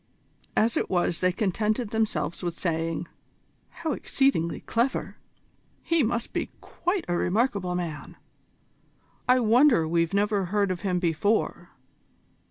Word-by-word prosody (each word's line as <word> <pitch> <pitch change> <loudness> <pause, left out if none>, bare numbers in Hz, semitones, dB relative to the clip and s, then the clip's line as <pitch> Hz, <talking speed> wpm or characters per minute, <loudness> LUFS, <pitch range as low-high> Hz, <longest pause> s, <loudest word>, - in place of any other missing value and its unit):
As 225 +2 +3
it - - -1
was 175 -2 +1
they 185 0 +3
contented 215 +3 -1
themselves 220 -5 -1
with 175 -2 -3
saying: 165 -1 -2 0.6
"How 320 -2 -4
exceedingly 270 - 0
clever!" 240 +3 -1 0.7
"He 335 -1 +2
must 235 -1 -1
be - - -2
quite 355 +2 -2
a 175 - 0
remarkable 185 -1 0
man!" 165 -4 -5 1.1
"I 255 0 +6
wonder 235 - +4
we've 170 +2 +1
never 205 -1 +1
heard 200 +1 +1
of 175 -2 -4
him 185 -2 0
before!" 175 +5 0
200 Hz, 125 wpm, -26 LUFS, 175-235 Hz, 1.1 s, I